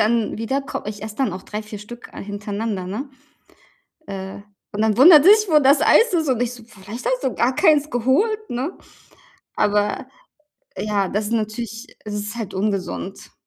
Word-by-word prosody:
dann 220 0 +1
wieder 250 +5 -1
ko - - -5
ich 210 -1 -6
esse 215 0 -7
dann 260 -9 0
auch 185 - -7
3, 210 +1 -5
4, 210 0 -9
Stück, 235 +4 -11
äh, - - -8
hintereinander, 205 -1 -4
ne? 225 +9 -5 1.0
Äh, 190 0 -6 0.3
und 210 +1 -1
dann 220 -2 +2
wundert 300 +2 +9
sich, 425 +1 +6
wo 305 -2 +6
das 275 +1 +5
Eis 460 -3 +5
ist 320 -3 +1
und 250 -2 +1
ich 245 0 -1
so: 240 -2 -12
„Vielleicht 220 +1 -10
hast - - 0
du 260 - 0
gar 250 +2 +1
keins 305 -2 +3
geholt, 395 - +1
ne?" 260 +9 -3 0.8
Aber, 205 0 +1 0.7
ja, 205 -2 0
das 205 +1 -2
natürlich 225 0 -3 0.2
das 210 - -5
ist 210 +2 -4
halt 205 -4 -5
ungesund. 190 - -3
225 Hz, 180 wpm, -21 LUFS, 205-270 Hz, 1.0 s, wundert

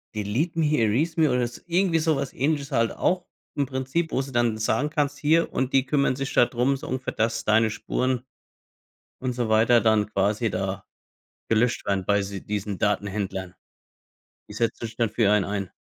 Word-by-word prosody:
Delete 115 - -1
me, 150 -1 +2
Erase 130 +10 +1
me 155 -2 +4
oder 125 -1 +1
so 120 - -12
irgendwie 175 -1 +2
sowas 150 -4 0
ähnliches 145 +1 -1
halt 115 -3 +2
auch 180 -1 0 0.3
im 140 - +1
Prinzip, 135 +5 -2
wo 130 - +1
sie 135 0 -7
dann 120 -2 +1
sagen, 135 +7 0
kannst: 145 -2 -1
„Hier“ 160 +3 +2
und 130 0 -1
die 135 -1 +4
kümmern 140 -1 +1
sich 135 +1 -4
da - - +6
drum, 125 +3 0
so - - -9
ungefähr, 130 0 -3
dass 110 0 -1
deine 110 +1 +4
Spuren 125 +3 -2 1.0
und 125 -1 -3
so 120 -2 -1
weiter 115 +2 +4
dann 110 -2 +3
quasi 105 +3 +1
da 95 0 -3 0.6
gelöscht 115 +2 +1
werden 100 -2 0
bei 100 +1 +2
sie 100 -1 -6
diesen 100 -2 -3
Datenhändlern. 95 -2 -2 0.9
Sie - - -10
setzen 115 0 -1
sich 110 0 -11
dann 115 -3 +1
für 110 -1 +2
einen 105 -2 +3
ein. 100 -2 -3
120 Hz, 185 wpm, -25 LUFS, 105-140 Hz, 1.0 s, da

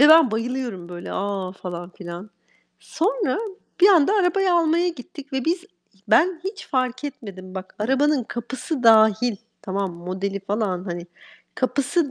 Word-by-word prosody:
ve 295 - +8
ben 315 -5 +8
bayılıyorum 230 -5 -3
böyle 175 0 -7
a, 195 -2 -2
falan 175 -2 -7
filan. 180 +2 -9 0.5
Sonra 400 - 0 0.4
bir 380 - +8
anda 360 -2 +5
arabayı 385 -1 +3
almaya 340 +1 +3
gittik 285 -2 -9
ve 265 -2 -1
biz 345 +2 0 0.4
ben 345 0 +4
hiç 395 +1 -5
fark 255 0 -1
etmedim. 190 -9 -8
Bak 190 0 -7
arabanın 270 +4 +2
kapısı 245 +5 -4
dâhil, 220 0 +5 0.3
tamam 195 -1 -2
modeli 185 +3 -4
falan, 195 -2 -2
hani, 175 -2 -5 0.5
kapısı 280 +4 0
245 Hz, 140 wpm, -23 LUFS, 190-310 Hz, 0.5 s, ve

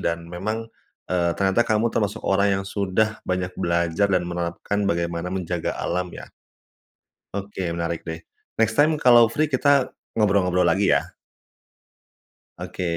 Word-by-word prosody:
dan 85 0 -2
memang, 110 +6 -3 0.5
eee, 85 -2 +1
ternyata 95 +3 +2
kamu 110 +1 +2
termasuk 105 0 -1
orang 100 +1 +2
yang - - -11
sudah 100 +2 0
banyak 90 0 -1
belajar 85 +3 +1
dan 90 -2 +2
menerapkan 90 +4 -2
bagaimana 85 -1 -1
menjaga 90 -2 -3
alam 90 +1 -2
ya. - - -10 1.0
Oke 100 -1 -4
menarik 85 0 -3
deh. 80 0 -5 0.4
Next 110 0 +1
time 155 +2 +5
kalau 120 -5 +6
free 150 +7 -1
kita 140 0 +3 0.2
ngobrol-ngobrol 95 -4 +2
lagi 95 +4 +3
ya. - - +2 1.6
Oke, - - -6
95 Hz, 135 wpm, -23 LUFS, 85-110 Hz, 1.6 s, kalau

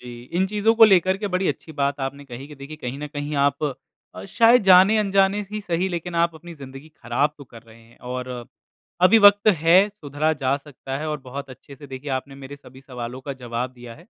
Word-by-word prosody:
जी, 120 -1 -10
इन 175 +8 -1
चीज़ों 210 +3 +1
को 225 0 +8
लेकर 190 -2 +4
के 205 - -3
बड़ी 185 +1 +1
अच्छी 160 - -5
बात 140 -1 -2
आपने 140 +1 -5
कही 135 0 -9
कि 150 - -11
देखिए 140 +2 -10
कहीं 130 -2 -6
न 150 - -5
कहीं 145 0 -5
आप 140 0 -2 0.5
शायद 235 +4 +4
जाने-अनजाने 195 +1 +4
ही 215 0 -4
सही 180 -1 -2
लेकिन 175 -1 -5
आप 170 0 +1
अपनी 170 +2 -11
ज़िंदगी 135 0 -12
ख़राब 145 0 -2
तो 140 - -11
कर 115 -3 -15
रहे 115 0 -18
हैं। 115 +1 -22
और 125 +1 -6 0.7
अभी 205 +5 +6
वक़्त 205 0 +6
है, 180 +2 +4
सुधरा 155 -5 -2
जा 140 -2 -1
सकता 140 -2 -8
है। 155 +1 -4
और 150 0 -3
बहुत 135 +2 -8
अच्छे 135 +2 -13
से 145 - -12
देखिए 135 +1 -8
आपने 135 +1 -4
मेरे 140 +1 -10
सभी 130 -2 -16
सवालों 125 -1 -8
का 140 +1 -6
जवाब 120 +1 -4
दिया 120 -2 -12
है। - - -18
145 Hz, 215 wpm, -22 LUFS, 130-185 Hz, 0.7 s, को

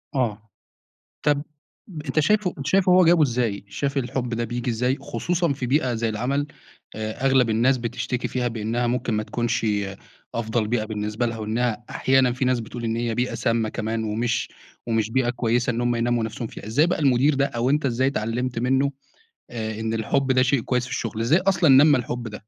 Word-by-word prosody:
آه، 110 -4 -1 0.7
طب 145 -1 +2 0.6
أنت 140 +2 0
شايفه 190 +4 +2
أنت 140 - -5
شايفه 190 -1 +3
هو 180 0 +6
جابه 170 0 +5
إزاي؟ 115 -6 -1
شايف 135 +8 -2
الحب 125 -1 -2
ده 115 0 -1
بييجي 120 +2 -3
إزاي؟ 125 +4 0
خصوصًا 170 +1 -1
في 130 -2 -4
بيئة 130 -1 +1
زي 115 0 -1
العمل، 135 +7 -1 0.5
آآ 110 +4 -4
أغلب 130 -3 +4
الناس 120 +4 +3
بتشتكي 125 +1 -3
فيها 125 -1 -1
بأنها 115 +1 -1
ممكن 125 -1 -1
ما 110 0 0
تكونش 120 0 -1 0.7
أفضل 110 -1 -1
بيئة 115 -1 0
بالنسبة 105 +2 -2
لها، 115 -1 -3
وإنها 115 +2 -1
أحيانًا 130 -2 +2
في 130 +1 -1
ناس 125 -1 +2
بتقول 120 +1 -7
إن 115 0 -1
هي 115 -1 -1
بيئة 125 +1 -1
سامَّة 115 -1 0
كمان، 110 0 -3
ومش 115 +2 -1 0.4
ومش 110 -1 0
بيئة 125 0 +1
كويسة 120 +1 0
إن 120 +1 -2
هُم 120 0 +1
ينمّوا 120 0 +1
نفسهم 110 +1 -4
فيها. - - -10
إزاي 145 +10 +3
بقى 180 - 0
المدير 140 0 +3
ده، 140 +1 +2
أو 120 -1 -1
أنت 145 +1 +1
إزاي 130 0 +1
اتعلمت 120 -1 -2
منّه، 135 +3 +2 0.6
آآ 110 -2 -4
إن 110 0 -2
الحُب 130 +4 0
ده 130 0 +4
شيء 130 -1 +2
كويس 125 +1 0
في 125 - -10
الشغل؟ 115 -1 -3
إزاي 140 +10 +3
أصلًا 185 -4 +2
نمَّى 145 +2 +7
الحب 120 -1 -4
ده؟ 105 0 -9
120 Hz, 195 wpm, -24 LUFS, 115-135 Hz, 0.7 s, نمَّى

